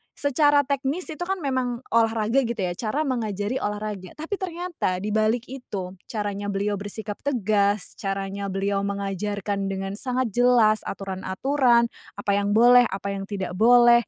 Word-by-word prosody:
secara 290 +1 +3
teknis 280 +5 -2
itu 310 - -8
kan 385 -3 -2
memang 255 -3 -1
olahraga 225 +1 +3
gitu 235 - -2
ya, 185 -5 -1
cara 220 - -2
mengajari 225 -3 -2
olahraga. 205 -3 -4
Tapi 330 +6 -4
ternyata 350 - -2
dibalik 215 +2 +1
itu, 200 -9 -6 0.2
caranya 205 -2 -3
beliau 200 0 -1
bersikap 205 +1 -5
tegas, 210 -6 0
caranya 195 0 -3
beliau 195 +1 -1
mengajarkan 200 0 -2
dengan 195 0 -3
sangat 255 -2 -1
jelas 235 -2 +4
aturan-aturan, 235 +6 +1 0.2
apa 205 0 -2
yang 200 +1 +1
boleh, 245 +2 +7
apa 200 +1 -4
yang 195 0 -5
tidak 195 -3 -4
boleh, 240 0 +6
215 Hz, 140 wpm, -24 LUFS, 200-250 Hz, 0.2 s, boleh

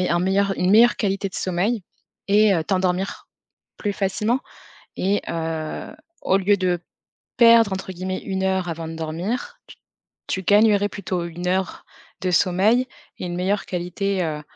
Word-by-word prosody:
un 175 -1 +1
meilleur 195 +2 +2
une 180 - +2
meilleure 230 +4 +6
qualité 195 -1 -1
de 185 - -17
sommeil 190 +5 -1 0.5
et, 205 0 +5
heu, 165 -3 0
t'endormir, 185 +1 -1 0.5
plus 205 - -1
facilement 210 +6 0 0.6
et 200 +2 +1
heu, 160 -1 -4 0.3
au 190 - +3
lieu 200 +1 +3
de 180 -2 0 0.6
perdre 230 -3 +6
entre 190 0 -4
guillemets, 185 +1 -4
1 190 -1 -2
heure 190 -1 0
avant 165 -1 -4
de 165 - -6
dormir, 180 - -4
tu - - -13 0.5
tu 190 - -2
gagnerais 205 +1 +4
plutôt 180 -3 -3
1 175 +1 -6
heure 190 0 -1 0.4
de 185 - 0
sommeil 205 +8 +3 0.3
et - - -4
une 175 0 -4
meilleure 195 +3 0
qualité, 185 +2 -2
heu 150 -1 -3
190 Hz, 155 wpm, -22 LUFS, 180-205 Hz, 0.6 s, meilleure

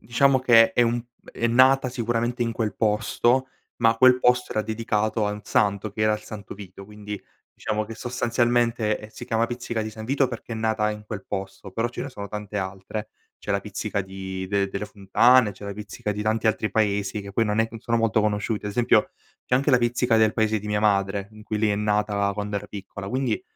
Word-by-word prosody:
diciamo 130 +3 +3
che 115 -3 +6
è 120 - +4
un 120 +1 +1
p 120 0 -36 0.2
è 115 - 0
nata 130 +2 +5
sicuramente 120 0 -1
in 115 - -1
quel 110 -3 -2
posto, 115 +4 +2 0.3
ma 115 -1 +3
quel 130 +1 +6
posto 125 0 +3
era 110 - +1
dedicato 110 -1 -1
a 105 - 0
un 105 - -5
santo, 100 0 +1
che 110 +2 -3
era 110 0 +4
il 105 - -2
Santo 105 -2 -9
Vito, 100 -1 -11
quindi 105 0 -7 0.4
diciamo 105 0 -2
che 115 - -7
sostanzialmente 120 -3 0
si - - -9
chiama 115 0 +1
Pizzica 120 -2 -4
di 110 - -3
San 110 0 -9
Vito, 135 +2 +1
perché 120 -1 -7
è 115 - -3
nata 110 -1 0
in 105 0 -7
quel 105 -3 -6
posto, 95 0 -6
però 115 +4 -1
ce 120 - -6
ne 140 - -6
sono 100 -4 -7
tante 105 0 -5
altre; 95 +3 -5 0.3
c'è - - -7
la 100 - +1
Pizzica 105 0 -3
di 95 0 -6
del 100 -1 +1
delle 100 +2 -4
Fontane, 105 +3 +4
c'è 95 +2 -12
la 100 - -4
pizzica 105 0 -5
di 105 - -5
tanti 110 +1 0
altri 110 -1 +1
paesi 100 -1 0
che 100 0 -9
poi 115 +2 +2
non 105 +1 0
è 115 - +1
non 115 -1 -9
sono 115 0 0
molto 115 -1 +2
conosciuti, 105 0 -1
ad 105 - -2
esempio 120 +2 +3 0.4
c'è - - +1
anche 140 +3 +2
la 125 - +5
pizzica 120 0 +2
del 110 -1 +3
paese 110 -1 +1
di 105 - -9
mia 105 0 0
madre, 100 -1 +1
in 110 0 -14
cui 105 0 -3
lì 110 0 +2
è - - +2
nata 105 -1 +1
quando 105 -1 -3
era - - -5
piccola, 100 -1 -8
quindi 125 -2 -1
110 Hz, 225 wpm, -24 LUFS, 105-120 Hz, 0.4 s, che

